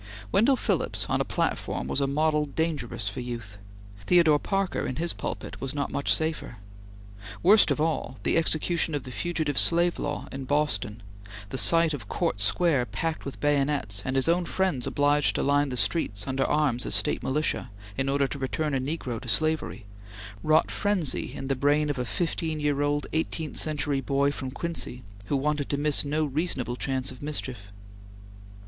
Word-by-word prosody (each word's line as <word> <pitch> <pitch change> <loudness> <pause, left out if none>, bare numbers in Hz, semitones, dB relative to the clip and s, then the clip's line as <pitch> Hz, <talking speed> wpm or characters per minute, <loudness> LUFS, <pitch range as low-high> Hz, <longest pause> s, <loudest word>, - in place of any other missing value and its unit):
Wendell 260 +6 +4
Phillips - - -1
on - - +2
a - - +2
platform - - -2
was 140 - 0
a 140 - +2
model 150 +1 +1
dangerous 145 -8 -3
for 100 - -3
youth. 115 -5 -6 0.5
Theodore 165 -4 +5
Parker 195 +2 -1
in 130 - -3
his 170 +3 +1
pulpit - - -6
was 135 +1 -3
not 140 -1 -2
much 140 - 0
safer. 155 -7 -1 0.9
Worst 205 +4 +6
of - - 0
all, 155 -5 -1
the - - +1
execution 165 0 +2
of 145 - -3
the 130 - -8
Fugitive 155 -1 0
Slave 170 +1 +3
Law 145 0 -3
in 135 0 -6
Boston 130 -7 -1 0.5
the 130 - -4
sight 165 -1 +5
of 120 -8 -7
Court 100 - -1
Square 135 - +2
packed 165 -1 -3
with 140 - -7
bayonets, 140 -8 0
and 130 - -2
his 135 +2 +2
own 175 +1 +2
friends 175 -9 -1
obliged 145 +1 +2
to - - 0
line 145 0 +2
the 125 - -4
streets 105 - 0
under 135 0 0
arms 145 -5 +1
as - - +2
State - - +2
militia, 140 -2 -1 0.3
in 135 +4 -1
order 140 0 +2
to 140 +1 -4
return 150 +3 -2
a 135 - +1
negro 130 -4 -4
to 130 - -10
slavery 155 -5 0 0.6
wrought 155 +1 +3
frenzy 200 -9 0
in 135 - -5
the 135 - +1
brain 145 +2 +2
of 135 - -4
a 125 - -1
fifteen 160 - -2
year 145 -1 0
old, 145 0 0
eighteenth 160 -1 -2
century 145 -3 +1
boy 140 +1 +1
from 130 -2 -5
Quincy, 135 -4 -3 0.2
who 140 - +1
wanted 145 +1 -1
to 140 - 0
miss 145 0 +1
no 150 +2 0
reasonable 140 -4 -2
chance 130 0 -2
of 125 - -12
mischief. 130 -8 -4
145 Hz, 180 wpm, -27 LUFS, 130-160 Hz, 0.9 s, Worst